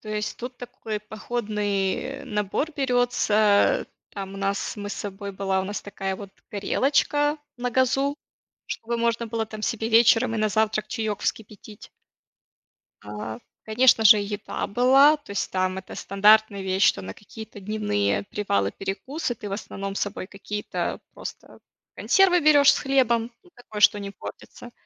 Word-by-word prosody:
То 215 - -12
есть 210 0 -3
тут 245 +1 -7
такой 230 -3 -6
походный 210 +1 -3
набор 210 +9 -2
берётся. 245 - +2 0.2
Там 195 -1 -7
у - - -7
нас 195 +2 -2
мы 205 -1 -5
с - - -4
собой 200 0 -6
была 190 0 -1
у - - -3
нас 205 +2 -5
такая 195 -1 -4
вот 200 0 -9 0.2
горелочка 290 +7 +1 0.2
на 245 0 -2
газу, 270 +3 +1 0.5
чтобы 235 +1 -4
можно 235 0 0
было 225 0 -2
там 215 0 -9
себе 225 -1 -1
вечером 230 +1 +4
и - - -1
на 215 0 +2
завтрак 215 0 0
чаёк 220 -4 -3
вскипятить. 210 -1 -6 1.1
А, 105 +2 -6 0.2
конечно 225 0 +4
же, 210 +1 +9
еда 205 +1 -4
была, 265 +8 +5
то 290 -8 -17
есть 200 - -2
там 185 0 0
это 190 - -9
стандартная 205 0 +3
вещь, 190 +1 +1
что - - +3
на 95 +1 -7
какие-то 220 0 -11
дневные 190 - -1
привалы, 100 - -1
перекусы 240 +8 -4
ты 205 -1 -8
в - - -6
основном 195 -1 -5
с - - -3
собой 205 -2 -3
какие-то 210 +1 -4
просто - - -9 0.4
консервы 375 -2 +4
берёшь 290 -2 +6
с - - -1
хлебом, 245 -4 +1
ну 360 - -22
такое, 215 -3 -9
что 205 - +6
не 200 0 -6
портится. 240 +4 -11
215 Hz, 155 wpm, -24 LUFS, 200-245 Hz, 1.1 s, же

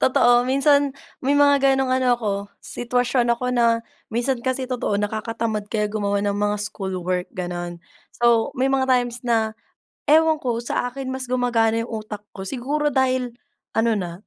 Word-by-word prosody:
totoo 245 -1 +4
minsan 280 +2 +4 0.3
may 280 +2 +2
mga 280 -1 +5
ganung 265 -1 +1
ano 255 -1 +3
ako 220 -3 -2 0.3
sitwasyon 245 0 0
ako 250 +1 -2
na 240 -1 +3 0.4
minsan 240 +2 -1
kasi 260 +1 -1
totoo 250 -5 -1
nakakatamad 215 0 -2
kaya 210 -1 -1
gumawa 205 -1 0
ng 205 - +1
mga 205 0 0
schoolwork 185 -3 -3
ganun. 175 -1 -4 0.4
So 235 -1 +3
may 260 +1 +1
mga 265 -1 +1
times 245 -1 +1
na 225 -2 +1 0.6
ewan 315 +1 +5
ko 240 -3 -2
sa 240 - -1
akin 260 +1 -5
mas 260 -1 -4
gumagana 230 -3 +1
yung 230 -1 -5
utak 210 -1 -7
ko 190 0 -7
siguro 280 +6 -1
dahil 255 -2 +1 0.4
ano 230 +1 +3
na, 175 +1 -6
240 Hz, 160 wpm, -22 LUFS, 215-260 Hz, 0.6 s, mga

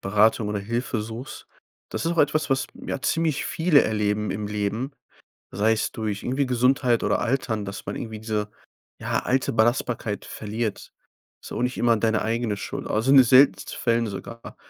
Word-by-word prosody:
Beratung 105 +2 +2
oder 105 - -1
Hilfe 115 +2 -2
suchst. 115 +4 -8 0.4
Das - - -3
ist 170 - +1
auch 170 - -5
etwas, 150 +1 +2
was, 135 0 +1 0.2
ja, - - -3
ziemlich 160 -3 0
viele 160 -3 +3
erleben 105 -1 0
im 105 +2 -3
Leben, 105 +6 -2 0.6
sei 105 +3 +2
es 110 - -1
durch 105 -2 -3
irgendwie 135 +2 0
Gesundheit 125 -1 +2
oder - - +1
Altern, 115 -4 -1
dass 100 - -7
man - - -5
irgendwie 110 -3 -6
diese, 105 -1 -2 0.5
ja, - - -1
alte 130 +1 0
Belastbarkeit 115 -2 0
verliert. 110 0 -5 0.5
Ist - - -9
auch - - -2
nicht 125 0 -1
immer 120 -1 +3
deine 110 0 +1
eigene 115 -1 -1
Schuld, 140 +7 -6
also, 110 +5 +1
in 140 - +8
den 130 - +8
seltensten 130 +3 +4
Fällen 115 -1 +1
sogar. 115 +3 -8
115 Hz, 175 wpm, -24 LUFS, 105-130 Hz, 0.6 s, in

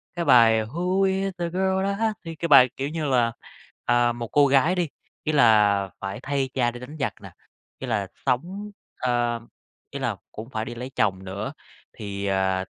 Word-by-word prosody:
cái 170 -1 -2
bài 115 -4 +6
"Who 180 - -1
is 195 0 +1
that 170 -1 -3
girl 190 +1 +1
I 200 - -1 0.3
thì 165 0 -6
cái 170 +2 -3
bài, 135 -4 +8
kiểu 135 +1 -2
như, 160 0 -3
là, 125 -4 +2 0.5
à, 120 0 +3
một 120 0 -5
cô 145 +4 +4
gái 140 +6 +3
đi, 175 -4 0 0.3
ý 155 - 0
là 105 -7 +4
phải 95 0 -5
thay 135 -1 -1
cha 120 -3 +1
đi 120 - -9
đánh 145 +5 -9
giặc 125 -7 -1
nè, - - -10 0.5
ý 130 - -5
là 105 -5 -1 0.2
sống, 180 +11 -2 0.3
ờ 120 -1 0 0.5
ý - - -5
là - - -1 0.2
cũng 110 +3 -8
phải 110 -3 -3
đi 120 - -7
lấy 125 +2 -6
chồng 95 -2 +1
nữa. 100 +8 -5 0.4
Thì, 100 -2 -5
ờ, 95 -1 +1
125 Hz, 195 wpm, -24 LUFS, 110-160 Hz, 0.5 s, bài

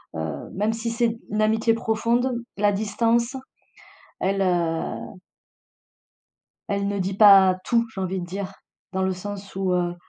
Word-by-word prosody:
heu, 80 -3 -5
même 210 +3 0
si 230 +1 -3
c'est 230 -1 0
une 215 - 0
amitié 220 +1 +3
profonde 230 +3 0 0.2
la 205 0 +3
distance, 230 +4 +1 0.9
elle, 195 +1 +1
heu 170 -3 0 1.8
elle 200 0 -1
ne 200 -1 -2
dit 190 +1 -2
pas 195 -3 +7
tout, 235 -1 +2
j'ai 195 - -4
envie 185 0 -2
de 175 - -5
dire. 190 +2 -5 0.4
Dans 190 - -1
le 190 0 +1
sens 200 +1 -8
où, 190 -1 0
heu, 175 -1 0
200 Hz, 150 wpm, -24 LUFS, 185-225 Hz, 1.8 s, pas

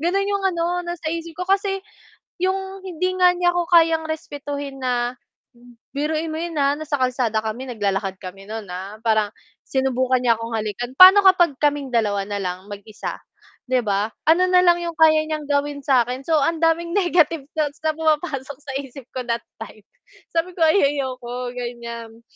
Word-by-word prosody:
Gano'n 390 +5 0
'yong 400 -1 -1
ano 335 0 -1 0.2
nasa 345 -2 -4
isip 335 0 -5
ko. 365 - -3
Kasi 390 0 +1 0.6
yung 385 +1 -2
hindi 365 +1 -2
nga 360 -1 +5
niya 350 0 +2
ako 350 -1 0
kayang 325 -1 +4
respetuhin. 285 -3 -5
Na-biruin 250 +5 -4
mo 315 - -4
yun 340 0 -4
ha 280 0 +3
nasa 310 -2 -4
kalsada 250 -4 0
kami 230 +4 -4
naglalakad 195 -3 -1
kami 195 +2 -9
no'n 220 -1 -6
ha, 195 +4 -7
parang 215 -2 +2 0.4
sinubukan 260 -1 +1
niya 230 -2 +3
akong 230 0 -5
halikan. 220 +3 -3
Paano 380 +2 +10
kapag 350 -6 +5
kaming 290 -2 +1
dalawa 205 -4 +1
na 205 -1 -3
lang 185 +1 -5
mag-isa, 205 +1 -7 0.5
'di 255 -1 +1
ba? 205 0 0 0.2
Ano 340 +4 +4
na 365 0 +4
lang 345 -1 +5
'yong 340 -1 -4
kaya 310 -1 +5
niyang 310 -1 -3
gawin 285 0 0
sa 255 -4 +3
akin. 255 +2 -5
So 315 +1 +2
ang 325 +3 0
daming 335 +2 +1
negative 350 -5 +2 0.2
thoughts 295 0 -1
na 315 - +2
pumapasok 300 -4 -1
sa 275 -2 -7
isip 275 -2 -9
ko 255 -1 -5
that 235 0 -1 0.2
time. 215 -1 -10 0.5
Sabi 345 +2 -1
ko 335 - -2
ay 320 +5 +4 0.2
"Ayoko" 250 -2 -4
gan'yan 235 -2 -7
280 Hz, 175 wpm, -22 LUFS, 235-335 Hz, 0.6 s, Paano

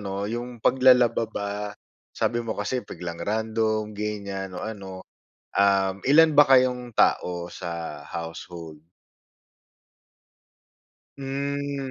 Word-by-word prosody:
'no, 100 0 -3
'yong 120 +2 -5
paglalaba 125 -3 +5
ba, 100 -1 -3 0.6
sabi 120 0 -1
mo 110 -1 -3
kasi 125 +5 -1
biglang 85 -4 -7
random, 110 0 -1
ganiyan 100 -2 -4
o - - -6
ano, 95 -4 -7 0.6
um, 100 -1 +3
ilan 155 +3 +7
ba 145 - +10
kayong 125 -2 +4
tao 85 -1 +2
sa 85 -4 -6
household? 80 -1 -8 2.3
Hmm. 140 0 -3
110 Hz, 100 wpm, -25 LUFS, 95-125 Hz, 2.3 s, ba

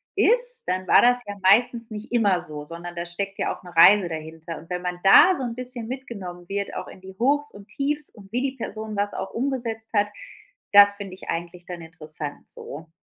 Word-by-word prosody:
ist, - - +4
dann 185 +1 -1
war - - +6
das 245 +1 +5
ja 205 0 -6
meistens 230 +4 +3
nicht 215 +1 -8
immer 200 -7 +2
so, 150 -3 -8
sondern 170 +2 -8
da 170 0 -4
steckt 195 +3 -5
ja - - -2
auch - - -19
'ne 175 -1 -12
Reise 185 +2 +7
dahinter. 160 +1 -7
Und 165 - -14
wenn 180 0 -3
man 180 -1 -4
da 355 - +7
so 265 - -4
'n 235 -1 -4
bisschen 250 -2 -4
mitgenommen 200 -10 -8
wird, 200 0 -3
auch - - -5
in - - -13
die 190 0 -12
Hochs 290 +4 +1
und 205 +1 -14
Tiefs 290 +1 -2
und 200 -2 -17
wie 250 - 0
die 270 0 -3
Person 220 -2 -6
das 205 0 +1
auch - - -5
umgesetzt 235 -3 -3
hat, 205 -1 +2 0.7
das 205 0 +8
finde 200 -2 -6
ich 190 - -12
eigentlich 175 +1 -5
dann 175 -2 -8
interessant 155 -2 -8
so. 160 +3 -7
200 Hz, 215 wpm, -24 LUFS, 175-240 Hz, 0.7 s, das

